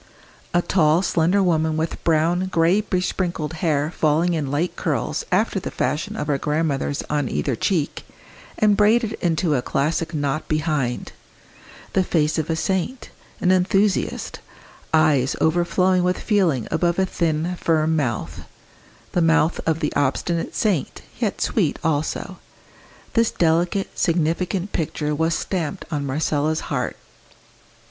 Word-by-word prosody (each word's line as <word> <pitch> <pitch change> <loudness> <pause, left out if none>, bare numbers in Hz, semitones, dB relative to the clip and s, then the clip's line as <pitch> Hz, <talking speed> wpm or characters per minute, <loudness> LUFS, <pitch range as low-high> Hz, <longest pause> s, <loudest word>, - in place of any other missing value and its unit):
A 175 0 +2
tall 165 -1 +3
slender 180 +3 +2
woman 160 -3 +1
with 160 +1 -3
brown, 170 +3 +2
grey 175 +2 +3
besprinkled 180 -5 -2
hair 150 -2 +1
falling 165 +2 +1
in 150 -4 -2
light 155 +6 -1
curls - - -2
after - - +2
the - - -5
fashion 150 - -2
of 150 - -3
our 140 -2 0
grandmothers 150 -2 -1
on 145 -3 -1
either 135 - -1
cheek, 155 - -1 0.5
and 210 -1 +4
braided 220 +2 +3
into 165 -2 +1
a 130 - +1
classic 155 +5 -1
knot 145 -1 -2
behind 155 -5 -1 0.8
the 190 - +3
face 155 -3 +1
of 160 +1 -3
a 160 - +1
saint, 190 +9 -2 0.3
an 180 - +3
enthusiast 190 +2 +1 0.5
eyes 150 -5 +3
overflowing 180 +2 +2
with 180 0 +1
feeling 175 - +1
above 170 +1 +1
a 190 - +3
thin 170 -1 -1
firm 160 -1 +1
mouth 125 -8 -2 0.7
the 175 - +1
mouth 165 0 +3
of 160 0 +1
the 150 - -1
obstinate 165 +5 -1
saint, 200 - -1 0.2
yet - - -1
sweet - - +1
also: 160 -1 -2 0.7
this 230 -1 +3
delicate 175 +4 0
significant 175 +3 0
picture 150 -2 -2
was 160 +2 +1
stamped 180 0 -3
on 145 -2 -2
Marcella's 150 +2 0
heart. - - -2
165 Hz, 135 wpm, -22 LUFS, 150-180 Hz, 0.8 s, and